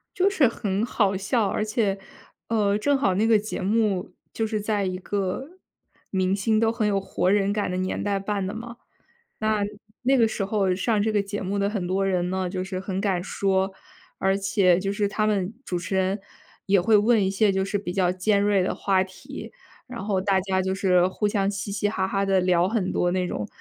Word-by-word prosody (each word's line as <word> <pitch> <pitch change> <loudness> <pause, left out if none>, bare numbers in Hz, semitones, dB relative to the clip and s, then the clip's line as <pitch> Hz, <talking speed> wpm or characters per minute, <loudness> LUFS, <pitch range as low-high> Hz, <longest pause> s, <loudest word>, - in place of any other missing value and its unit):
就 380 +1 +3
是 320 -9 +3
很 205 -2 -1
好 200 -5 +1
笑， 205 +3 +1
而 215 - -1
且， 210 -3 0 0.5
呃， 205 -3 +2
正 280 +6 +2
好 190 -8 +2
那 215 +4 +2
个 225 -2 +5
节 215 -1 -5
目 205 -1 0 0.2
就 225 - -1
是 215 -1 -2
在 205 -1 0
一 185 -1 -2
个 200 +8 -3 0.6
明 190 0 +1
星 215 +2 +1
都 225 0 +3
很 230 -2 -1
有 200 -1 +1
活 185 -1 0
人 200 0 +2
感 205 -3 -1
的 180 - -2
年 185 0 -2
代 200 -1 0
办 195 -1 -2
的 195 - -3
嘛。 235 +1 -8 0.6
那 215 -1 +1 0.4
那 265 +2 +3
个 225 -2 +4
时 200 - -2
候 195 -2 +1
上 210 +3 0
这 220 - +1
个 205 -1 +2
节 205 +1 -5
目 200 +2 -2
的 200 0 +1
很 195 -5 -2
多 195 +2 0
人 180 -2 0
呢， 185 -1 -1
就 185 -1 -3
是 190 0 -4
很 190 0 -3
敢 190 -4 0
说， 190 0 0 0.5
而 195 0 +2
且 195 -3 +3
就 195 +1 -2
是 205 0 0
他 215 +1 0
们 200 0 0
主 180 - -2
持 175 +2 -4
人 190 +2 0 0.5
也 195 -1 +4
会 215 +4 +4
问 215 -1 +4
一 190 - +1
些 200 +1 +3
就 190 0 0
是 205 +1 -1
比 195 -3 -5
较 180 -1 +2
尖 200 +2 +1
锐 205 -2 +3
的 - - -1
话 190 -2 +2
题。 190 - -10 0.4
然 235 -4 -6
后 195 -3 0
大 190 0 +2
家 190 0 0
就 190 0 -1
是 185 -2 +3
互 210 +2 -1
相 200 -1 +1
嘻 200 0 -4
嘻 205 0 0
哈 190 -3 -1
哈 195 0 0
地 195 -1 +3
聊 180 -1 +3
很 210 -4 -1
多 175 - +1
那 180 0 0
种 105 - -3
195 Hz, 240 characters per minute, -25 LUFS, 190-215 Hz, 0.6 s, 个